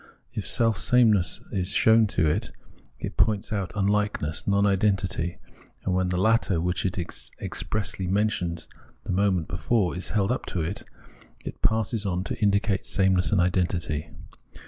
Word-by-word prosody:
If -, -, -4 dB
sameness 115 Hz, -3 st, +3 dB
is 90 Hz, -1 st, -1 dB
shown 110 Hz, 0 st, +5 dB
to 90 Hz, -4 st, +1 dB
it, 100 Hz, +10 st, -1 dB, 0.5 s
it -, -, -6 dB
points 105 Hz, +1 st, +1 dB
out 100 Hz, -3 st, -2 dB
unlikeness, 100 Hz, -6 st, 0 dB
non 100 Hz, 0 st, +3 dB
identity; 95 Hz, -3 st, 0 dB, 0.5 s
and 95 Hz, -, 0 dB
when 90 Hz, 0 st, +1 dB
the 90 Hz, -, -1 dB
latter, 100 Hz, -3 st, +2 dB
which 90 Hz, +2 st, -1 dB
it 95 Hz, -, -3 dB
has 90 Hz, -2 st, -5 dB
expressly 100 Hz, -3 st, -3 dB
mentioned 90 Hz, -4 st, -1 dB, 0.4 s
the -, -, -4 dB
moment 95 Hz, -3 st, +1 dB
before, 90 Hz, +1 st, 0 dB
is 90 Hz, -1 st, -5 dB
held 105 Hz, 0 st, +1 dB
up 125 Hz, -, -2 dB
to 90 Hz, -, -2 dB
it, 85 Hz, +6 st, -4 dB, 0.6 s
it -, -, -7 dB
passes 110 Hz, -1 st, +1 dB
on 90 Hz, -1 st, -1 dB
to 85 Hz, -, -5 dB
indicate 100 Hz, -1 st, +1 dB
sameness 95 Hz, -2 st, +2 dB
and 105 Hz, -, +3 dB
identity. 85 Hz, -4 st, 0 dB
95 Hz, 150 wpm, -26 LUFS, 90-105 Hz, 0.6 s, shown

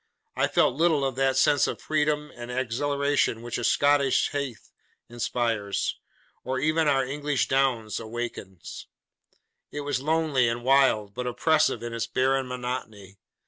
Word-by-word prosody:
I -, -, +2 dB
felt -, -, +2 dB
little 155 Hz, -1 st, +2 dB
of 135 Hz, -2 st, -2 dB
that 135 Hz, -1 st, +1 dB
sense 145 Hz, +1 st, +4 dB
of -, -, -4 dB
freedom 150 Hz, -1 st, -1 dB
and 120 Hz, 0 st, -8 dB
exhilaration 135 Hz, 0 st, 0 dB
which 120 Hz, 0 st, -4 dB
a -, -, -4 dB
Scottish 145 Hz, +1 st, +3 dB
heath 140 Hz, -5 st, -5 dB, 0.4 s
inspires, 115 Hz, -3 st, -2 dB, 0.4 s
or 130 Hz, +1 st, -2 dB
even 155 Hz, +3 st, +1 dB
our 135 Hz, -2 st, +2 dB
English 145 Hz, 0 st, -1 dB
downs 130 Hz, -5 st, 0 dB
awaken. 115 Hz, -5 st, -6 dB, 1.1 s
It 145 Hz, -, -4 dB
was 145 Hz, -3 st, -2 dB
lonely 150 Hz, -5 st, +1 dB
and 120 Hz, +1 st, -3 dB
wild, 130 Hz, -6 st, +3 dB
but 125 Hz, +2 st, -4 dB
oppressive 150 Hz, -1 st, +1 dB
in 120 Hz, 0 st, -5 dB
its 115 Hz, 0 st, -2 dB
barren 130 Hz, +2 st, +1 dB
monotony. 115 Hz, -6 st, -6 dB
130 Hz, 140 wpm, -26 LUFS, 120-145 Hz, 1.1 s, sense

